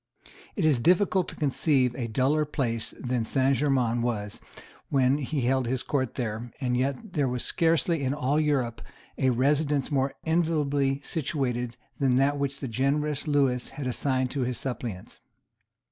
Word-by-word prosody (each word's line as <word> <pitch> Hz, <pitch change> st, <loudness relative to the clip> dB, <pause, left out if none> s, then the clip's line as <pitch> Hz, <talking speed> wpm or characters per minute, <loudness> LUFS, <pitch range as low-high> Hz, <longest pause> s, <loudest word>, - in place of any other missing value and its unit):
It 190 Hz, -, 0 dB
is 145 Hz, -6 st, +4 dB
difficult 185 Hz, -, +3 dB
to -, -, -8 dB
conceive 135 Hz, -3 st, +2 dB
a 120 Hz, -2 st, -3 dB
duller 135 Hz, +7 st, +2 dB
place 120 Hz, -6 st, -2 dB
than 125 Hz, -2 st, -1 dB
Saint 135 Hz, +3 st, +2 dB
Germains 125 Hz, -4 st, +1 dB
was 105 Hz, -4 st, -3 dB, 0.5 s
when 135 Hz, +1 st, +3 dB
he 145 Hz, 0 st, -2 dB
held 130 Hz, 0 st, +1 dB
his 130 Hz, 0 st, -1 dB
Court 130 Hz, -5 st, -1 dB
there; 115 Hz, -1 st, -4 dB
and 125 Hz, -2 st, 0 dB
yet 135 Hz, -, -2 dB
there 145 Hz, -3 st, +1 dB
was 125 Hz, -1 st, -2 dB
scarcely 165 Hz, -2 st, +1 dB
in 130 Hz, -, +1 dB
all 145 Hz, +1 st, +1 dB
Europe 135 Hz, -7 st, 0 dB, 0.4 s
a 130 Hz, -, +3 dB
residence 145 Hz, +3 st, +1 dB
more 135 Hz, -1 st, 0 dB
enviably 145 Hz, -4 st, +1 dB
situated 125 Hz, -6 st, -2 dB, 0.2 s
than 130 Hz, -3 st, +3 dB
that 140 Hz, +2 st, +2 dB
which 140 Hz, 0 st, -2 dB
the 135 Hz, -, -3 dB
generous 140 Hz, +5 st, 0 dB
Lewis 135 Hz, -4 st, +1 dB
had 145 Hz, -, -6 dB
assigned 130 Hz, 0 st, 0 dB
to 140 Hz, -, -2 dB
his 125 Hz, 0 st, -1 dB
suppliants. 120 Hz, -7 st, -5 dB
135 Hz, 160 wpm, -27 LUFS, 125-145 Hz, 0.5 s, is